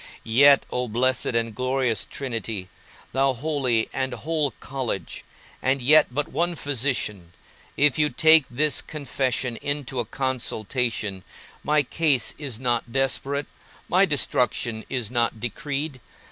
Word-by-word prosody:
Yet, 140 +5 +6
O 125 0 -1
blessed 125 +3 +1
and 115 -1 0
glorious 130 -3 0
Trinity, 115 -7 -4 0.4
O 135 0 +2
holy 130 -4 0
and 130 -1 -2
whole 155 -2 -1
college, 125 - -4 0.4
and 135 +1 +1
yet 150 +5 +6
but 145 +4 -2
one 170 +4 -1
physician, 120 - -2 0.4
if 145 -1 +3
you 150 -1 +3
take 160 +2 +6
this 145 +4 +1
confession 130 -5 -2
into 145 -3 -3
a 120 - -1
consultation, 115 -5 -2 0.4
my 150 0 +3
case 145 -4 +1
is 135 -7 -4
not 120 -2 -1
desperate, 135 +2 -1 0.4
my 185 +2 +4
destruction 125 -6 0
is 125 -4 -2
not 120 -2 0
decreed. 140 +3 -4
130 Hz, 125 wpm, -24 LUFS, 120-145 Hz, 0.4 s, Yet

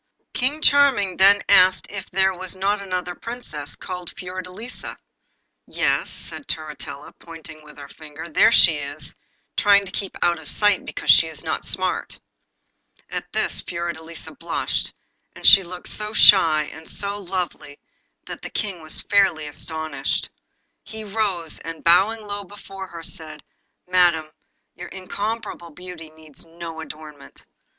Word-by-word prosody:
King 285 +5 -1
Charming 265 -10 +4
then 200 +1 +6
asked 185 -2 +6
it 195 -2 -6
there 190 0 +3
was 185 +1 -5
not 200 +2 0
another 180 -2 -3
Princess, 175 -10 -6
called 180 -1 -6
Fiordelisa. 185 +6 -6 0.7
'Yes,' - - 0
said 285 - -6
Turritella, 150 -2 -6
pointing 160 -2 -10
with 150 0 -15
her 140 -1 -9
finger, 155 +1 -10
'there 215 +8 +5
she 165 -8 +6
is, 145 0 -2 0.4
trying 200 -1 +5
to 195 - -7
keep 195 -1 -4
out 170 -1 +2
of 155 - -6
sight 205 -1 +2
because - - +2
she - - +7
is - - -6
not - - -2
smart.' - - -2 0.9
At - - -5
this - - 0
Fiordelisa 170 -1 -6
blushed, - - -2 0.4
and - - -7 0.2
looked 180 0 -8
so 210 0 -4
shy 165 -8 +7
and 160 0 -12
so 200 0 -2
lovely, 180 -6 -4 0.5
that - - -8
the - - -6
King 195 -6 -3
was 155 0 -2
fairly 195 -6 +3
astonished. 160 0 -3 0.5
He 220 0 -5
rose, 200 -6 -1
and 165 -1 -8
bowing 205 +6 +4
low 205 0 -4
before 195 -1 -10
her, 170 -2 -9
said 160 -2 -3 0.4
'Madam, 175 -4 +3 0.4
your - - -8
incomparable 200 -1 -5
beauty 175 -1 -10
needs 155 -2 -9
no 165 -1 -8
adornment. 150 -2 -11
180 Hz, 140 wpm, -23 LUFS, 160-200 Hz, 0.9 s, she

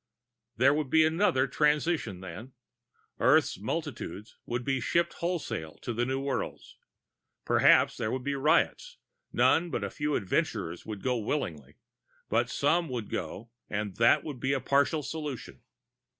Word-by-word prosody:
There 135 +4 +5
would 150 -2 -1
be 160 +3 +5
another 160 -5 +2
transition 150 - 0
then. 110 +8 -9 0.7
Earth's 145 +4 +3
multitudes 115 - -5
would 120 0 -3
be 135 -1 +1
shipped 170 +8 +1
wholesale 130 - -3
to 120 - -3
the 120 +2 0
new 135 +1 -1
worlds. 135 0 -4 0.7
Perhaps - - +5
there 110 - -1
would 130 -1 -3
be 140 +1 -1
riots; 155 - +1 0.3
none 175 +2 +3
but 120 -8 -2
a 100 - -3
few 150 0 -1
adventurers 85 -2 -2
would 105 -3 -6
go 125 -2 +1
willingly. 90 - -3 0.5
But - - +1
some 165 +3 +1
would 120 -5 -5
go, 115 +4 -5 0.2
and 105 -2 -3
that 115 +1 +5
would 145 -5 -6
be 135 +3 0
a 135 - +1
partial 140 +4 +2
solution. 150 -5 -6
130 Hz, 150 wpm, -29 LUFS, 115-150 Hz, 0.7 s, There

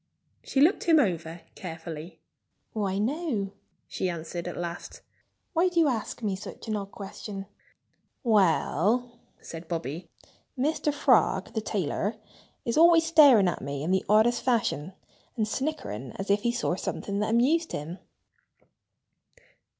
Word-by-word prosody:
She 270 - 0
looked 325 +7 +4
him 325 -3 +6
over 170 - -1
carefully. 165 -1 -8 0.5
"Why, 195 -3 -1
no!" 230 - -1 0.4
she 185 - -2
answered 170 +1 -5
at 175 - -5
last. 170 0 -6 0.5
"Why 350 +2 +3
do 350 -1 +1
you 325 - +5
ask 235 -2 -3
me 200 -3 0
such 200 +4 -9
an 215 - -1
odd 200 -1 -4
question?" 195 0 -7 0.8
"Well," 220 - +2 0.2
said 165 +1 -9
Bobby, 165 0 -4 0.5
"Mr. 300 +3 +1
Frog, 250 -9 +2
the 220 - -1
tailor, 205 +1 -2 0.5
is 235 - -1
always 335 0 +7
staring 285 - +7
at 175 - -2
me 140 0 -4
in 170 - -1
the 190 - +2
oddest 220 +3 +4
fashion 205 - 0 0.4
and 215 -2 +1
snickering 215 - -3
as 195 +1 -2
if 205 +1 +3
he 235 +1 +1
saw 240 -7 -1
something 200 +2 -3
that 210 - 0
amused 285 +9 +2
him." 160 +5 -5
210 Hz, 140 wpm, -27 LUFS, 175-250 Hz, 0.8 s, always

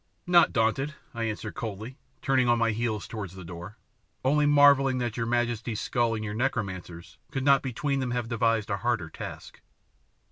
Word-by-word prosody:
"Not 175 -1 +5
daunted," 135 +6 0 0.2
I 115 -1 -2
answered 110 -1 -4
coldly, 110 +4 -6 0.2
turning 130 -3 +3
on 120 - +4
my 115 -1 +2
heels 110 -1 -2
towards 100 -5 -6
the 95 -2 -9
door, 90 +5 -9 0.5
"only 145 +2 +3
marvelling 140 -2 +5
that 120 -3 -2
your 115 -1 -2
majesty's 120 -2 -1
skull 120 -2 0
and 110 0 -4
your 105 - -4
necromancer's 95 -8 -3
could 135 - -3
not 140 -1 +5
between 135 +2 -2
them 130 -2 -1
have 120 -1 -2
devised 115 -2 +1
a 100 - 0
harder 115 -8 -1
task." - - -9
115 Hz, 175 wpm, -27 LUFS, 110-130 Hz, 0.5 s, Not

